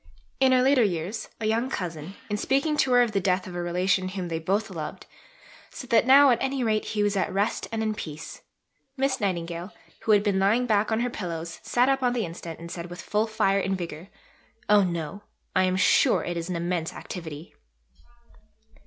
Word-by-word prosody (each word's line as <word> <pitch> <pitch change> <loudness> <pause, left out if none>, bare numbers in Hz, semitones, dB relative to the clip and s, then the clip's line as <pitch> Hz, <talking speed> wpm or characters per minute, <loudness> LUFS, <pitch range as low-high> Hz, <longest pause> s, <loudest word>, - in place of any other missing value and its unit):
In 265 -1 +5
her 255 -1 +4
later 265 -1 +4
years, 185 +2 -2
a 220 - -3
young 230 +4 +1
cousin, 175 - -5
in 210 - -2
speaking 275 +8 +1
to 265 - +2
her 245 0 +6
of 235 - -1
the 200 - +1
death 185 0 +1
of 185 - -8
a 175 - -3
relation 185 +2 +1
whom 185 -2 -5
they 165 -1 -2
both 200 +5 -1
loved, 155 -4 -6 0.6
said 255 -1 -10
that 230 +1 +4
now 275 +1 +8
at 240 - +1
any 265 -1 -1
rate 215 -2 +1
he 210 -1 -1
was 205 0 +1
at 190 - 0
rest 200 +3 -1
and 225 -1 -1
in 215 -1 0
peace. 155 -7 -8 0.6
Miss 265 -2 0
Nightingale, 175 -1 -2 0.3
who 220 - +2
had 205 -1 +4
been 200 -2 +1
lying 215 +6 +3
back 215 -2 +1
on 220 +1 +1
her 245 - 0
pillows, 170 -4 -5
sat 245 +1 +2
up 270 0 +2
on 250 -1 +2
the 235 -4 -1
instant 165 -1 -8
and 170 0 -9
said 170 0 -6
with 175 0 -9
full 210 +5 0
fire 200 -2 +1
and 190 0 -1
vigour, 170 -1 -7 0.6
"Oh 210 -1 +6
no, 170 +1 -3 0.3
I 185 - +4
am 185 0 +1
sure - - +4
it 175 - -3
is 170 +1 -4
an 180 - -2
immense 170 -1 -2
activity." 160 -3 -8
195 Hz, 210 wpm, -26 LUFS, 175-230 Hz, 0.6 s, now